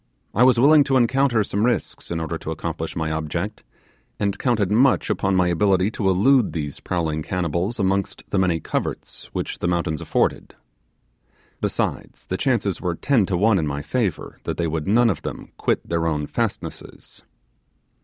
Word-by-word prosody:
I 110 Hz, -, +1 dB
was 125 Hz, -2 st, +6 dB
willing 145 Hz, +3 st, +7 dB
to 135 Hz, -2 st, +2 dB
encounter 125 Hz, -2 st, +3 dB
some 100 Hz, +1 st, -1 dB
risks 120 Hz, +1 st, -1 dB
in 85 Hz, -, -2 dB
order 80 Hz, +1 st, -3 dB
to -, -, -7 dB
accomplish 80 Hz, 0 st, -4 dB
my 80 Hz, -1 st, -2 dB
object, 85 Hz, +7 st, -3 dB, 0.6 s
and 100 Hz, -1 st, -1 dB
counted 110 Hz, -7 st, +1 dB
much 130 Hz, +5 st, +3 dB
upon 95 Hz, -1 st, 0 dB
my 90 Hz, -1 st, +3 dB
ability 95 Hz, +2 st, +2 dB
to 100 Hz, -3 st, 0 dB
elude 115 Hz, +6 st, +3 dB
these 75 Hz, -3 st, -4 dB
prowling 80 Hz, -3 st, -2 dB
cannibals 90 Hz, +5 st, -2 dB
amongst 95 Hz, 0 st, 0 dB
the 100 Hz, -, +2 dB
many 90 Hz, -3 st, +2 dB
coverts -, -, -4 dB
which -, -, -4 dB
the -, -, -1 dB
mountains 85 Hz, -3 st, -1 dB
afforded. -, -, -1 dB, 1.1 s
Besides, -, -, -3 dB
the 95 Hz, -, -3 dB
chances 110 Hz, -7 st, 0 dB
were 90 Hz, -2 st, -1 dB
ten 115 Hz, -2 st, +2 dB
to 90 Hz, -, 0 dB
one 100 Hz, +1 st, +3 dB
in 80 Hz, -, -1 dB
my 70 Hz, 0 st, -3 dB
favour 110 Hz, -, -2 dB
that -, -, -4 dB
they 85 Hz, -, 0 dB
would 80 Hz, -1 st, -2 dB
none 115 Hz, +3 st, +4 dB
of 85 Hz, -, -5 dB
them -, -, -7 dB
quit -, -, -1 dB
their 85 Hz, -1 st, 0 dB
own 75 Hz, -2 st, -1 dB
fastnesses. -, -, -5 dB
95 Hz, 175 wpm, -22 LUFS, 85-115 Hz, 1.1 s, willing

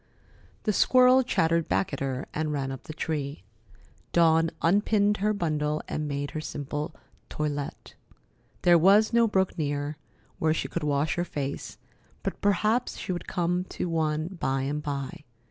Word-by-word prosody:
The 210 Hz, -, +1 dB
squirrel 255 Hz, +4 st, +6 dB
chattered 165 Hz, -9 st, +1 dB
back 95 Hz, +1 st, 0 dB
at -, -, -3 dB
her 135 Hz, -1 st, -2 dB
and 155 Hz, 0 st, -1 dB
ran 135 Hz, -2 st, -2 dB
up 135 Hz, -, -8 dB
the -, -, -7 dB
tree. 150 Hz, -2 st, -3 dB, 0.7 s
Dawn 165 Hz, -1 st, +4 dB
unpinned 205 Hz, +3 st, +3 dB
her 210 Hz, +2 st, +1 dB
bundle 155 Hz, -6 st, -1 dB
and 150 Hz, 0 st, -3 dB
made 145 Hz, 0 st, -3 dB
her 155 Hz, -, -4 dB
simple 150 Hz, 0 st, -4 dB, 0.3 s
toilet. 145 Hz, -2 st, -4 dB, 0.7 s
There 175 Hz, -1 st, +6 dB
was 200 Hz, +6 st, +5 dB
no 235 Hz, -1 st, +5 dB
brook 190 Hz, -3 st, +1 dB
near, 145 Hz, 0 st, -2 dB, 0.4 s
where 160 Hz, 0 st, +2 dB
she -, -, -2 dB
could 170 Hz, -, -3 dB
wash 145 Hz, +2 st, 0 dB
her 175 Hz, -, +1 dB
face, 140 Hz, -5 st, -5 dB, 0.5 s
but -, -, -4 dB
perhaps 215 Hz, +4 st, +1 dB
she -, -, -4 dB
would 175 Hz, -, -4 dB
come 180 Hz, 0 st, 0 dB
to 180 Hz, -, -4 dB
one 155 Hz, -1 st, 0 dB
by 135 Hz, 0 st, +1 dB
and 145 Hz, +2 st, -2 dB
by. 145 Hz, +2 st, -5 dB
160 Hz, 160 wpm, -27 LUFS, 145-185 Hz, 0.7 s, squirrel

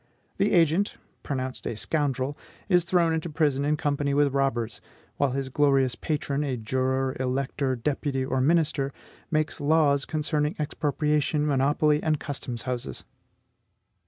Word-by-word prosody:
The 200 Hz, +2 st, +2 dB
agent, 170 Hz, +3 st, +3 dB, 0.3 s
pronounced 130 Hz, -2 st, -4 dB
a 110 Hz, -, -3 dB
scoundrel, 140 Hz, 0 st, -1 dB, 0.3 s
is 180 Hz, -3 st, +3 dB
thrown 170 Hz, -2 st, +2 dB
into 160 Hz, +1 st, -2 dB
prison 150 Hz, -3 st, +1 dB
in 150 Hz, +1 st, +1 dB
company 145 Hz, -1 st, 0 dB
with 145 Hz, -1 st, +3 dB
robbers; 120 Hz, -5 st, -1 dB, 0.4 s
while 140 Hz, -, +2 dB
his 135 Hz, -1 st, -2 dB
glorious 135 Hz, -2 st, +3 dB
patron, 145 Hz, +1 st, -2 dB
a 135 Hz, -4 st, -2 dB
juror, 130 Hz, +3 st, 0 dB
elector, 130 Hz, +1 st, -1 dB
deputy, 135 Hz, +1 st, -1 dB
or 130 Hz, 0 st, 0 dB
minister, 145 Hz, -2 st, +2 dB, 0.4 s
makes 155 Hz, -1 st, -1 dB
laws 145 Hz, -2 st, +3 dB
concerning 150 Hz, -1 st, -1 dB
expropriation, 150 Hz, 0 st, 0 dB
monopoly, 150 Hz, +2 st, +2 dB
and 155 Hz, -2 st, +1 dB
custom 130 Hz, -4 st, -4 dB
houses! 120 Hz, -, -4 dB
145 Hz, 130 wpm, -26 LUFS, 130-150 Hz, 0.4 s, agent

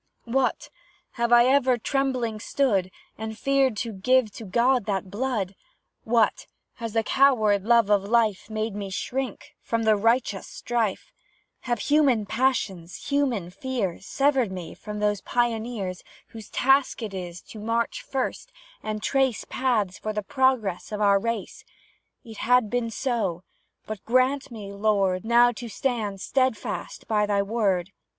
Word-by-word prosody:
What! 255 Hz, +2 st, 0 dB, 0.4 s
have 235 Hz, 0 st, -1 dB
I 240 Hz, 0 st, +7 dB
ever 260 Hz, -1 st, +3 dB
trembling 250 Hz, -3 st, -1 dB
stood, 205 Hz, -7 st, +1 dB, 0.3 s
And 220 Hz, 0 st, -5 dB
feared 275 Hz, -4 st, +2 dB
to 230 Hz, -, -5 dB
give 245 Hz, +3 st, +2 dB
to 225 Hz, -, -9 dB
God 240 Hz, +4 st, +2 dB
that 195 Hz, -2 st, -2 dB
blood? 215 Hz, -4 st, -2 dB, 0.5 s
What! 225 Hz, -1 st, +2 dB, 0.3 s
has 230 Hz, -3 st, -5 dB
the 225 Hz, -1 st, +2 dB
coward 220 Hz, -7 st, +3 dB
love 230 Hz, -3 st, +4 dB
of 205 Hz, -1 st, +5 dB
life 220 Hz, -2 st, +1 dB
Made 215 Hz, 0 st, -2 dB
me 200 Hz, -1 st, -5 dB
shrink 250 Hz, +4 st, -4 dB
from 230 Hz, 0 st, -1 dB
the 220 Hz, -1 st, +4 dB
righteous 225 Hz, -1 st, +1 dB
strife? 235 Hz, -, -2 dB, 0.6 s
Have 240 Hz, -, +2 dB
human 280 Hz, -8 st, +3 dB
passions, 200 Hz, -8 st, -1 dB
human 255 Hz, -11 st, 0 dB
fears 200 Hz, -4 st, -3 dB
Severed 270 Hz, -6 st, +2 dB
me 180 Hz, -3 st, -6 dB
from 210 Hz, 0 st, -7 dB
those 210 Hz, -1 st, 0 dB
Pioneers 225 Hz, -6 st, -2 dB, 0.3 s
Whose 220 Hz, -2 st, -11 dB
task 270 Hz, -1 st, +2 dB
is 180 Hz, -4 st, -5 dB
to 220 Hz, -, -11 dB
march 230 Hz, +2 st, -1 dB
first, 270 Hz, -, -3 dB, 0.3 s
and 215 Hz, 0 st, -4 dB
trace 265 Hz, -3 st, +1 dB
Paths 215 Hz, -8 st, 0 dB
for 215 Hz, -, -3 dB
the 210 Hz, 0 st, -2 dB
progress 235 Hz, -6 st, 0 dB
of 210 Hz, -, -3 dB
our 200 Hz, -1 st, +4 dB
race? 230 Hz, -1 st, -4 dB, 0.6 s
It 225 Hz, -4 st, -11 dB
has 250 Hz, +1 st, +4 dB
been 230 Hz, +2 st, -2 dB
so; 215 Hz, -8 st, -2 dB, 0.4 s
but 215 Hz, -2 st, -6 dB
grant 255 Hz, +3 st, +2 dB
me, 210 Hz, -4 st, -8 dB
Lord, 200 Hz, -2 st, +1 dB
Now 240 Hz, +1 st, +5 dB
to 240 Hz, 0 st, -8 dB
stand 215 Hz, -6 st, -2 dB
steadfast 260 Hz, -3 st, -2 dB
by 210 Hz, -1 st, +2 dB
Thy 200 Hz, -1 st, +2 dB
word! 200 Hz, -4 st, 0 dB
225 Hz, 145 wpm, -25 LUFS, 205-255 Hz, 0.6 s, I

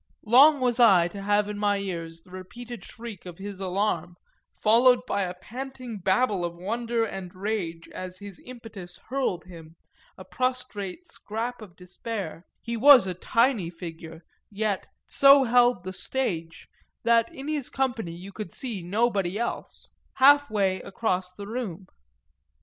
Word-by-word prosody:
Long 275 Hz, +7 st, +7 dB
was 250 Hz, -1 st, 0 dB
I 190 Hz, -8 st, +6 dB
to 200 Hz, +3 st, -8 dB
have 205 Hz, +1 st, +2 dB
in 210 Hz, 0 st, -5 dB
my 205 Hz, -1 st, +2 dB
ears 165 Hz, -4 st, -5 dB
the 180 Hz, -, -21 dB
repeated 235 Hz, +6 st, -9 dB
shriek 225 Hz, -6 st, -9 dB
of 175 Hz, -1 st, -9 dB
his 200 Hz, 0 st, -7 dB
alarm, 185 Hz, -2 st, -1 dB, 0.4 s
followed 245 Hz, +3 st, +5 dB
by 200 Hz, -4 st, -1 dB
a 180 Hz, -1 st, -2 dB
panting 250 Hz, +2 st, -7 dB
babble 190 Hz, +1 st, +1 dB
of 170 Hz, 0 st, -4 dB
wonder 230 Hz, +5 st, -1 dB
and 190 Hz, -4 st, -7 dB
rage 185 Hz, -5 st, -3 dB
as 185 Hz, 0 st, -7 dB
his 200 Hz, -1 st, -10 dB
impetus 220 Hz, -8 st, -10 dB
hurled 250 Hz, -10 st, -1 dB
him, 165 Hz, -2 st, -13 dB, 0.4 s
a -, -, -11 dB
prostrate 255 Hz, -, -3 dB
scrap 235 Hz, -6 st, -5 dB
of 190 Hz, -5 st, -12 dB
despair 180 Hz, -1 st, -6 dB, 0.2 s
(he 235 Hz, 0 st, -3 dB
was 260 Hz, -1 st, +8 dB
a 185 Hz, -, -2 dB
tiny 230 Hz, 0 st, +1 dB
figure, 165 Hz, -1 st, -9 dB, 0.3 s
yet 205 Hz, -1 st, -2 dB, 0.2 s
"so 275 Hz, 0 st, +6 dB
held 245 Hz, -4 st, +3 dB
the 185 Hz, 0 st, -5 dB
stage" 170 Hz, -9 st, -3 dB, 0.4 s
that 230 Hz, 0 st, +3 dB
in 270 Hz, +2 st, -8 dB
his 300 Hz, -4 st, -2 dB
company 245 Hz, -10 st, -2 dB
you 185 Hz, +3 st, -10 dB
could 210 Hz, -4 st, -7 dB
see 230 Hz, -8 st, -5 dB
nobody 200 Hz, 0 st, 0 dB
else) 235 Hz, +1 st, -5 dB, 0.2 s
half 285 Hz, +1 st, +6 dB
way 195 Hz, -3 st, 0 dB
across 185 Hz, -3 st, -2 dB
the 200 Hz, +2 st, -9 dB
room. 205 Hz, -5 st, -5 dB
205 Hz, 150 wpm, -26 LUFS, 180-240 Hz, 0.4 s, was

